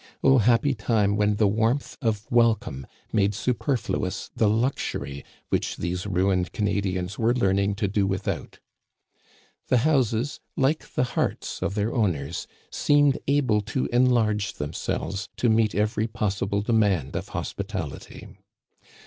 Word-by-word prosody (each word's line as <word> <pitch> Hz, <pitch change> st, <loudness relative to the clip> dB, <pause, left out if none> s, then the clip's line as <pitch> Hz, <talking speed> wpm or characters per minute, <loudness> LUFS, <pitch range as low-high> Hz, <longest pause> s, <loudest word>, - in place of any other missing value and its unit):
Oh, 135 Hz, -1 st, +6 dB
happy 120 Hz, +5 st, +3 dB
time 105 Hz, -3 st, +1 dB
when 105 Hz, 0 st, +2 dB
the 105 Hz, -, +2 dB
warmth 115 Hz, +7 st, 0 dB
of 110 Hz, -4 st, -1 dB
wel 115 Hz, -1 st, +5 dB
come 65 Hz, -10 st, -8 dB, 0.3 s
made 100 Hz, -2 st, +2 dB
superfluous 115 Hz, -5 st, -2 dB
the 110 Hz, -, +3 dB
luxury 105 Hz, -, -1 dB, 0.3 s
which -, -, -1 dB
these 90 Hz, +3 st, -3 dB
ruined 90 Hz, -2 st, +1 dB
Canadians 100 Hz, -2 st, -1 dB
were 115 Hz, +2 st, +2 dB
learning 100 Hz, -3 st, +1 dB
to 100 Hz, 0 st, -1 dB
do 100 Hz, 0 st, +1 dB
without! 95 Hz, 0 st, -3 dB, 1.1 s
The 125 Hz, -, +3 dB
houses, 130 Hz, -3 st, +1 dB, 0.2 s
like 140 Hz, +4 st, 0 dB
the -, -, +3 dB
hearts 125 Hz, -, -2 dB
of 95 Hz, +1 st, -1 dB
their 105 Hz, +2 st, 0 dB
owners, 90 Hz, -, -1 dB, 0.2 s
seemed 145 Hz, -2 st, +3 dB
able 130 Hz, -7 st, +2 dB
to 130 Hz, +5 st, -2 dB
enlarge 115 Hz, -5 st, +2 dB
themselves 95 Hz, +6 st, -4 dB
to 125 Hz, -, 0 dB
naeet 110 Hz, -1 st, +2 dB
every 105 Hz, +2 st, +1 dB
possible 100 Hz, -2 st, -1 dB
demand 100 Hz, -, +1 dB
of -, -, -3 dB
hospital -, -, -4 dB
ity -, -, -11 dB
105 Hz, 135 wpm, -25 LUFS, 100-120 Hz, 1.1 s, Oh